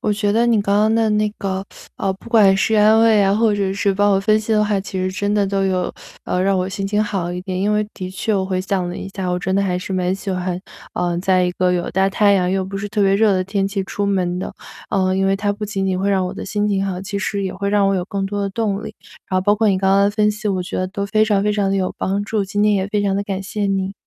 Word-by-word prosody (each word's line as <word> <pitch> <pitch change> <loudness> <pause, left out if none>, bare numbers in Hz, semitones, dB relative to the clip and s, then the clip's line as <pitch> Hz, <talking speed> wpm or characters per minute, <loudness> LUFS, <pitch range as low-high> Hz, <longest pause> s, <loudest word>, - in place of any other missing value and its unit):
我 210 - -1
觉 205 0 0
得 235 +2 +3
你 230 -2 +3
刚 200 0 0
刚 215 +1 +3
的 225 -1 +2
那 210 0 +2
个， 190 -1 -3 0.3
呃， 195 - -1
不 230 +4 -14
管 200 -4 +5
是 220 +3 +1
安 215 +1 +5
慰 225 -2 +5
啊， 195 0 +3
或 220 -1 +2
者 200 -2 0
是 200 -1 +1
帮 205 +1 +2
我 195 - +3
分 215 +2 +2
析 220 +1 -2
的 210 -1 +3
话， 205 -2 0
其 190 -1 -6
实 185 0 -1
真 205 +2 -1
的 205 -1 +2
都 195 0 0
有， 185 -1 -1 0.3
呃， 180 - -1
让 195 0 +2
我 180 - 0
心 195 +1 -4
情 210 +2 +1
好 190 -4 -3
一 175 - -4
点。 185 -1 -3
因 205 +2 +1
为 210 0 0
的 185 0 -6
确 210 +3 -2
我 190 - +1
回 185 -1 -1
想 185 -1 -1
了 175 - -5
一 - - -6
下， 190 -2 -3
我 180 - 0
真 190 +1 -2
的 200 - +2
还 180 -2 -1
是 190 - -6
蛮 185 0 0
喜 195 +1 -5
欢， 180 -1 -2 0.4
呃， 175 -1 -1
在 185 0 +2
一 180 - 0
个 180 0 +1
有 175 -1 -1
大 190 +1 +2
太 200 +1 +3
阳 180 -2 +2
又 190 0 0
不 195 +1 -5
是 205 +1 -4
特 210 0 0
别 195 0 +3
热 205 -1 +3
的 185 - 0
天 195 0 -1
气 195 -1 -3
出 200 +1 -3
门 180 -3 0
的， 185 - -4 0.4
嗯， 185 -1 +1
因 195 - +2
为 195 - +2
它 205 +1 0
不 205 +1 -10
仅 195 -2 -2
仅 185 -1 -1
会 195 - 0
让 190 -2 +2
我 - - -5
的 - - -7
心 205 +1 -1
情 200 -2 0
好， 185 -2 -3
其 200 +1 -4
实 200 0 -2
也 190 - -3
会 200 +1 -3
让 200 -1 +3
我 195 - +2
有 185 - 0
更 200 -2 -3
多 205 +1 -3
的 200 - -1
动 205 0 -2
力。 - - -8 0.3
然 185 - +1
后 185 - -1
包 205 +1 +4
括 215 0 +2
你 195 - +2
刚 190 0 +1
刚 200 0 +4
的 200 - +2
分 210 0 +2
析， 210 0 -4
我 185 -2 0
觉 180 - -5
得 185 - 0
都 200 +1 -4
非 215 +2 +2
常 205 -2 +2
非 210 0 +1
常 205 -2 0
得 195 - +1
有 185 -1 -1
帮 200 +2 -1
助， 215 -1 -1
今 205 +1 -1
天 210 - +4
也 195 -1 0
非 205 0 0
常 195 -1 +1
地 200 - 0
感 195 -1 -4
谢 205 +1 -3
你。 195 0 -1
195 Hz, 335 characters per minute, -19 LUFS, 190-205 Hz, 0.4 s, 管